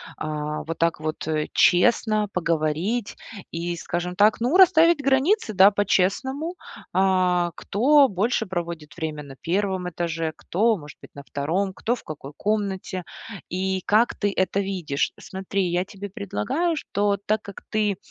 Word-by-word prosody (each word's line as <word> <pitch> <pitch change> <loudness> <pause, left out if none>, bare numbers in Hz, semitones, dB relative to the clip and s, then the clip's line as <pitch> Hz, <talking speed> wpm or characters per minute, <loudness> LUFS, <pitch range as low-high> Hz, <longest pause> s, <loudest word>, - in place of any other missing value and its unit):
а, 150 0 -4
вот 165 +1 -5
так 165 -1 0
вот, 155 0 -4
э, 155 -1 0
честно 215 +2 +3
поговорить 170 +6 -1 0.3
и, 170 +1 -3
скажем 175 +1 -4
так, 210 +3 +4
ну, 245 +8 +1
расставить 340 -4 +6
границы, 275 - +2
да, 195 +1 +7
по-честному. 235 - 0 0.4
А, 180 -2 +2
кто 275 +7 +4
больше 220 +3 0
проводит 170 -5 -5
время 155 -3 -4
на 140 -2 -11
1 185 0 -1
этаже, 165 -1 -2
кто, 220 +4 +1
может 150 -3 -12
быть, - - -15
на 140 - -9
2, 170 +9 -2
кто 235 +5 -1
в - - -13
какой 145 -2 -8
комнате, 200 -3 -2 0.5
и 190 +1 -1
как 220 +3 +3
ты 205 -1 0
это 190 +1 +1
видишь. 180 -7 -2
Смотри, 190 0 -3
я 175 +1 +1
тебе 200 +1 -9
предлагаю, 200 - -2
что 205 -7 0
так 215 +1 +1
как 200 - -11
ты, 210 -3 0
190 Hz, 150 wpm, -24 LUFS, 170-215 Hz, 0.5 s, да